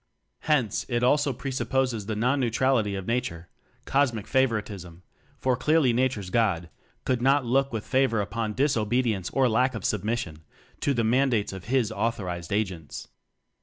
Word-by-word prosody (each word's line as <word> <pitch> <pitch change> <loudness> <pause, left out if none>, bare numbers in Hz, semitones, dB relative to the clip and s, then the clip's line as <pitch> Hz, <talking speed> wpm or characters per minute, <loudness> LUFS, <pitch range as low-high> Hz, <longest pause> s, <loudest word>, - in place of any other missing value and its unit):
Hence, 125 -9 +2
it 120 -1 0
also 145 +3 +3
pre 135 +2 -5
supposes 125 -4 -1
the 110 - -2
non 125 +6 +1
neutrality 120 -4 +1
of 95 -1 -5
Nature 115 -8 -3 0.4
cosmic 130 -7 +1
favoritism; 105 -9 -1 0.3
for 130 -1 +1
clearly 140 0 +3
nature's 115 -7 0
"God" 95 -8 +1 0.3
could 125 -2 0
not 135 +1 +3
look 135 +3 +1
with 110 -2 -4
favor 130 -4 +2
upon 105 +1 -2
dis 140 +4 +1
obedience 110 -3 0
or 135 -1 +2
lack 125 +2 +2
of 110 - -5
submission 105 -6 -2 0.4
to 140 - 0
the 115 - +1
mandates 120 -3 +1
of 95 -2 -8
His 120 -2 +1
authorized 100 -6 -3
agents. 95 -7 -3
115 Hz, 155 wpm, -26 LUFS, 105-130 Hz, 0.4 s, also